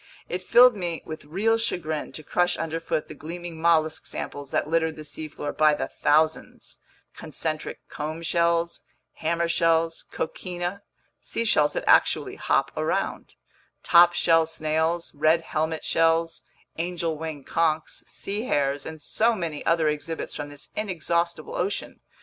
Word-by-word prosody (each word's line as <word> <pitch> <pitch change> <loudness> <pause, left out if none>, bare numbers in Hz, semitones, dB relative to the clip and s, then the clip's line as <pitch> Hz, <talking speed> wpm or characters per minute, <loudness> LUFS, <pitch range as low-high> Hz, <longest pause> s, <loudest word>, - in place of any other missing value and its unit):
It 180 - -3
filled 240 +5 +7
me 175 -4 -3
with 155 -2 -7
real 215 +9 +1
chagrin 160 -9 -2
to 155 - -7
crush 175 +3 +1
underfoot 165 -1 -2
the - - -8
gleaming 170 +1 -7
mollusk 160 -2 +2
samples 145 -1 -6
that - - 0
littered 160 0 +1
the 155 - -8
seafloor 150 0 -6
by 155 -1 +5
the 135 -2 -3
thousands: 150 - +1 0.4
concentric 155 0 -5
comb 155 +2 -5
shells, 170 0 +1 0.4
hammer 170 +1 0
shells, 165 -1 +1
coquina 175 +3 -4 0.4
(seashells 155 -10 +1
that - - -2
actually - - +3
hop - - +1
around), - - -2 0.5
top 175 0 +7
shell 165 -2 +3
snails, 160 +2 -1
red 155 +3 +3
helmet 160 0 -2
shells, 165 0 +2 0.4
angel 170 -1 -1
wing 155 -2 -6
conchs, 160 0 0
sea 205 +4 -4
hares, 140 - 0
and 160 -2 -8
so 230 +7 +2
many 165 -6 -4
other 165 -1 +3
exhibits 150 +2 -3
from 145 -1 -5
this 145 0 -7
inexhaustible 170 -5 -1
ocean. 195 +3 -3
165 Hz, 140 wpm, -25 LUFS, 155-170 Hz, 0.5 s, filled